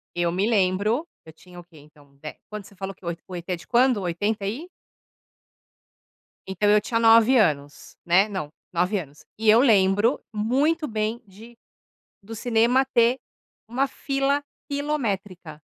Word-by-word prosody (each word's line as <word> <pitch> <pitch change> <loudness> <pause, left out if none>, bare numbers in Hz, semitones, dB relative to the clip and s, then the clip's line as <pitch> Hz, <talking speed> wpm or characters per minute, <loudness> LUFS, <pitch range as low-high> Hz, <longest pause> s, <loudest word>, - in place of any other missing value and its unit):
eu 175 -1 0
me 190 +4 0
lembro, 210 - +1 0.2
eu 160 - -12
tinha 180 +2 -15
o - - -11
quê 170 -2 -20
então, 145 -1 -20
de 155 +2 -9
Quando 210 -2 -7
você 200 - -17
falou 195 +1 -6
que 180 - -18
o - - -2
ET, 170 0 -5
o 185 - -8
ET 175 - -7
é 180 - 0
de 170 - -15
quando? 250 0 +3
80 200 +4 -2
e? 255 - -4 1.8
Então 190 +2 0
eu 210 0 +5
tinha 230 +2 -1
9 230 +3 +6
anos, 145 -8 -1
né? 185 +4 +4
Não, 185 -8 -5 0.2
9 180 +4 0
anos. 145 -3 -12
E 220 -1 +2
eu 225 +2 +7
lembro 205 0 +3
muito 280 +9 0
bem 220 0 -3
de 220 +4 -15 0.7
do 225 +3 -9
cinema 240 +3 +2
ter 240 -1 +2 0.5
uma 260 +4 0
fila 275 +1 -1 0.3
quilométrica. 205 - -3
210 Hz, 165 wpm, -24 LUFS, 180-235 Hz, 1.8 s, eu